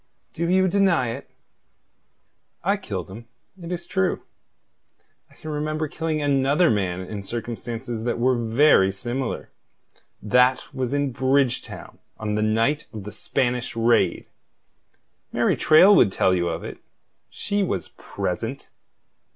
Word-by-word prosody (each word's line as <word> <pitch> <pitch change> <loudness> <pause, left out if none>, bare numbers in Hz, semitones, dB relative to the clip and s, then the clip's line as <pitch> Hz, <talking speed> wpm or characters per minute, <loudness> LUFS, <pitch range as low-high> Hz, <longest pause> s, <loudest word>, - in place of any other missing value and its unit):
"Do 170 +1 -2
you 185 +1 +4
deny 185 -9 +2
it?" 130 +5 -7 1.3
"I 200 +4 +2
killed 100 - -5
him, 115 +4 -10 0.3
it 170 +1 -7
is 175 -1 -4
true. 190 +1 -1 1.1
I - - -22
can 155 - -8
remember 155 +1 -2
killing 155 0 -2
another 145 +4 +3
man 95 -4 -1
in 100 +2 -6
circumstances 115 +1 -5
that 120 0 -1
were 125 +2 +2
very 115 -3 +4
similar. 120 +6 -4 0.7
That 125 +4 +2
was 130 +1 -2
in 140 -1 0
Bridgetown 130 0 -1 0.2
on 105 -1 -3
the 105 - 0
night 115 +8 +1
of 105 -2 -8
the 105 - -7
Spanish 125 +2 -2
raid. 115 +1 +2 1.1
Mary - - +2
Traill 185 +6 +6
would 105 - +5
tell 95 - +2
you 85 -1 0
of 85 0 -4
it. - - -8 0.5
She 205 0 -2
was 100 - -2
present." 115 +9 -5
125 Hz, 135 wpm, -23 LUFS, 110-155 Hz, 1.3 s, Traill